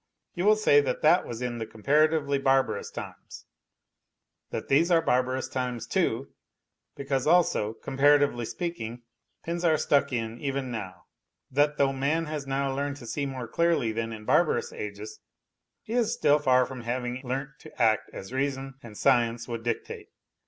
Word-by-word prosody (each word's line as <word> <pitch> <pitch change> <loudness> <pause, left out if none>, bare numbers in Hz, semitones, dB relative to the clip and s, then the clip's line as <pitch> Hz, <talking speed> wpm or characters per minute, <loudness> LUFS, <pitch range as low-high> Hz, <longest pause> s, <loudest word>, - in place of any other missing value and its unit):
You 175 +1 -2
will 215 +1 +6
say 175 -9 +5
that 130 -3 -3
that 170 +4 +4
was 120 +1 -5
in 120 -1 -3
the 110 - -4
comparatively 140 +5 +2
barbarous 135 -1 +1
times; - - -9 1.0
that - - -5
these 155 +6 +3
are 170 -2 +5
barbarous 130 -4 0
times 125 -3 -3
too, 135 -4 -1 0.6
because 135 -1 -2
also, 160 -11 +3
comparatively 140 -2 +2
speaking, 120 -7 -5 0.4
pins 170 +1 -3
are 160 -2 +4
stuck 140 -2 +2
in 115 -1 -3
even 135 -2 -2
now; 95 -6 -6 0.5
that 145 +2 +2
though 135 -1 +2
man 145 +5 0
has 150 -3 -5
now 135 0 -1
learned 140 +1 -2
to 125 - -11
see 140 +4 -2
more 130 -3 -5
clearly 165 -5 +1
than 115 +1 -3
in 110 -1 -8
barbarous - - +2
ages, 105 +1 -7 0.6
he 220 - -6
is 235 -2 +2
still 145 +1 +3
far 130 -3 +4
from 130 -1 -8
having 125 +1 -3
learnt 135 +2 -4
to - - -15
act 110 -2 +2
as 95 +6 -9
reason 135 0 -2
and 110 -3 -11
science 120 -3 +2
would 115 -2 -4
dictate. 120 - -4
135 Hz, 165 wpm, -27 LUFS, 120-145 Hz, 1.0 s, will